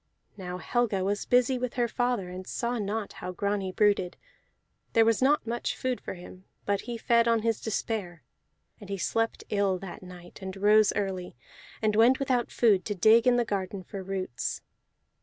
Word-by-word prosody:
Now 180 -2 -6
Helga 205 +1 0
was 205 +2 -1
busy 250 +1 +3
with 250 -1 -3
her 240 -1 +1
father, 245 -5 -1
and 185 +1 -8
saw 240 -1 -2
not 210 +1 -3
how 180 - -6
Grani 200 +1 -2
brooded; 200 -3 +1 0.8
there 225 -1 +5
was 230 0 +2
not 285 +1 +3
much 235 +1 -3
food 255 -1 -2
for - - -6
him, 185 +1 -12 0.2
but 200 -1 0
he 240 -1 -5
fed 235 +1 +3
on 230 -2 +2
his 225 -1 0
despair. 200 - -3 0.6
And 200 - -12
he 200 - -2
slept 225 +4 -1
ill 200 -2 +1
that 180 -1 -9
night, 180 0 -12
and 190 0 -6
rose 210 +1 +5
early, 190 -5 -3 0.5
and 215 -1 +2
went 235 +4 +5
without 255 -3 0
food 205 -6 +3
to 205 - -2
dig 225 +5 +5
in 250 - +5
the 240 -1 +2
garden 195 -2 -3
for 195 +2 -7
roots. 185 -9 -4
205 Hz, 180 wpm, -28 LUFS, 190-235 Hz, 0.8 s, there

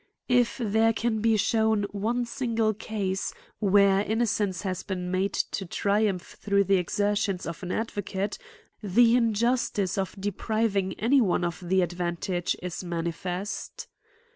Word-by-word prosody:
If 245 -1 +3
there 225 -1 +2
can 225 0 0
be 225 0 +3
shewn 220 0 +2
one 230 +4 -1
single 230 -3 0
case, 200 -2 -3 0.2
where 200 -1 +4
innocence 210 -4 0
has 185 -2 -2
been 180 -2 -4
made 190 +2 0 0.2
to 195 - -2
triumph 200 0 0
through 200 -1 +3
the 195 0 +3
exertions 200 +1 0
ofan 180 +2 -5
advocate, 205 - -3 0.4
the 230 +4 +4
injustice 230 -4 +1
of 190 -2 -3
depriving 205 -1 -1
any 260 +5 +3
one 180 -5 +1
of 170 -1 -3
the 185 +1 +2
advantage 175 +1 -2
is 180 0 -4
manifest. 175 +3 -4
200 Hz, 130 wpm, -27 LUFS, 185-225 Hz, 0.4 s, where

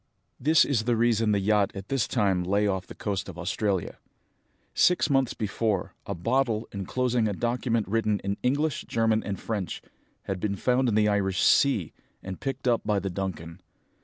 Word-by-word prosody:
"This 155 +4 +5
is 115 -6 0
the 120 -1 +2
reason 115 -1 +2
the 100 - +2
yacht 100 0 +2
at 95 0 -8
this 135 -4 0
time 100 -6 +1
lay 100 +3 +1
off 95 -2 -1
the - - -10
coast 100 -2 -3
of 90 - -9
Australia. 95 +1 -2 0.7
Six 180 -4 +3
months 135 -3 +2
before, 105 -2 -1
a 100 - -3
bottle, 115 +3 0
enclosing 120 +4 0
a 105 - -1
document 120 0 -1
written 105 0 +1
in 100 +1 -2
English, 145 +3 0
German, 115 -1 +1
and 100 -1 -4
French, 105 -6 -3 0.4
had 95 -1 -4
been 100 +1 -1
found 125 +5 +1
in 105 - 0
the 105 0 +4
Irish 95 -3 +1
sea, 120 - +3 0.3
and 95 -1 -6
picked 135 -1 -3
up 120 -2 +3
by 105 -1 +1
the 95 -1 -2
Duncan. 85 -3 -5
105 Hz, 180 wpm, -27 LUFS, 95-120 Hz, 0.7 s, This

